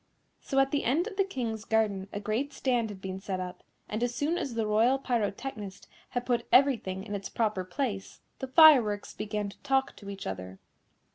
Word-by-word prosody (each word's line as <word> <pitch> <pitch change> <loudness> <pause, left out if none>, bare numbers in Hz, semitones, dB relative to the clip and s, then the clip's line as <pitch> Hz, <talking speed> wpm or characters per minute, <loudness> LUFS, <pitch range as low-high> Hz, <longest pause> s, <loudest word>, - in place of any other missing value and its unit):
So 270 - -4
at 270 0 +4
the 290 - 0
end 300 +9 +2
of 455 - -6
the 390 - +3
King's 235 - -4
garden 215 -4 +1
a 205 - -4
great 225 +8 -2
stand 245 -4 0
had 195 -2 -9
been 190 0 -4
set 195 -1 -4
up, 180 -1 -6 0.3
and 215 +2 -3
as 245 0 0
soon 305 +4 0
as 270 -8 -3
the 225 -1 0
Royal 225 +5 +3
Pyrotechnist 220 -4 -3 0.2
had 245 -1 -3
put 240 -1 0
everything 230 -9 +3
in 210 0 -7
its 200 -1 -4
proper 215 -5 0
place, 195 0 -4 0.2
the 265 - -4
fireworks 260 -9 +6
began 210 -1 -3
to - - -15
talk 270 0 +1
to 200 - -9
each 195 -1 -7
other. 95 0 -6
220 Hz, 200 wpm, -29 LUFS, 200-265 Hz, 0.3 s, fireworks